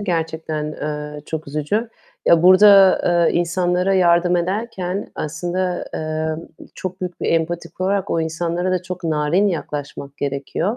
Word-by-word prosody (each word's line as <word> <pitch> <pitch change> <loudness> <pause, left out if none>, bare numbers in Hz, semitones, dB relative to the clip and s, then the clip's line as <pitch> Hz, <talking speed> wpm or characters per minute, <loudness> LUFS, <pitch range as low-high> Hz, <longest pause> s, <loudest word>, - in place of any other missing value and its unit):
gerçekten, 160 -4 -2
eee, 150 0 -5
çok 160 -2 -5
üzücü. 155 +11 -1 0.4
Ya, 170 0 +5
burada, 195 +1 +7 0.3
eee, - - 0
insanlara 180 +2 +1
yardım 175 -1 +3
ederken 190 +1 -3
aslında, 175 +4 -2
eee, 155 0 -2 0.4
çok 185 0 -6
büyük 180 -1 -5
bir - - -2
empati 165 +1 -1
kurarak 190 +1 -1
o 165 - +1
insanlara 170 +3 -2
da 185 -1 0
çok 180 -1 -7
narin 160 +6 +2
yaklaşmak 145 -4 -5
gerekiyor. 145 - -2
175 Hz, 135 wpm, -20 LUFS, 155-185 Hz, 0.4 s, burada